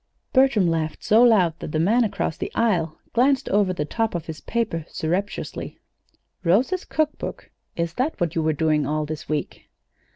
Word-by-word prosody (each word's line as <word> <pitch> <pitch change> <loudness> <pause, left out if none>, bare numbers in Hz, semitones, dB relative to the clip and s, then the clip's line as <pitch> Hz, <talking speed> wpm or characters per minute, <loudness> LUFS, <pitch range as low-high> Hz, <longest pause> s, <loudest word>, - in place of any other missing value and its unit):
Bertram 260 -7 +4
laughed 160 -2 -1
so 220 +2 +5
loud 185 -9 +4
that - - -6
the 155 - -1
man 220 +9 +3
across 195 -6 -2
the - - -5
aisle 175 -9 +1 0.2
glanced 260 +3 +3
over 200 -2 +3
the 150 -5 -2
top 225 +4 -1
of 170 -2 -3
his 160 -1 -7
paper 220 -9 -2
surreptitiously. 185 +6 -3 0.7
"Rosa's 245 - +2
cook 310 -1 0
book! - - -7 0.2
Is 170 -1 -2
that 260 - -1
what 170 -3 0
you 165 - 0
were 155 0 +1
doing 155 0 +1
all 155 +1 -1
this 155 +1 -7
week?" 150 -1 -4
175 Hz, 175 wpm, -23 LUFS, 160-230 Hz, 0.7 s, so